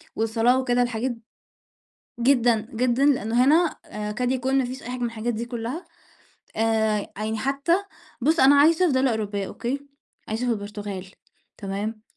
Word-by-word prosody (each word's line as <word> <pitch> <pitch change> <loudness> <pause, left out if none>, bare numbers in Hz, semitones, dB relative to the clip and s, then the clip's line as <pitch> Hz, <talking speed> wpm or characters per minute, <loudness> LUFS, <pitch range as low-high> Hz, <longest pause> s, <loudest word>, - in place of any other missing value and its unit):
والصلاة 225 +3 +2
وكده، 245 -1 +1
الحاجات 240 +1 -1 1.1
جدًا، 235 -3 +3
جدًا، 250 +3 +2
لأنه 250 -4 +3
هنا 320 +4 +3
آآ 210 0 -5
يكاد 245 +4 -1
يكون 265 +1 +1
ما 265 - +2
فيش 255 +2 -6
أي - - -7
حاجة 250 0 -5
من 240 - 0
الحاجات 230 +1 -3
دي 225 +2 -3
كلّها. 240 +7 -5 0.7
آآ 220 -2 +1
يعني 215 +1 -2
حتى 275 +6 0 0.5
بُصّ 315 +6 +2
أنا 275 +2 +7
عايشة 330 +4 +5
في 310 - +1
دولة 260 0 +2
أوروبية، 205 -3 -2
أوكي، 255 +8 -4 0.5
عايشة 220 +3 -2
في - - +1
البرتغال، 205 -2 -5 0.5
تمام، 210 +2 -4
240 Hz, 160 wpm, -24 LUFS, 220-260 Hz, 1.1 s, أنا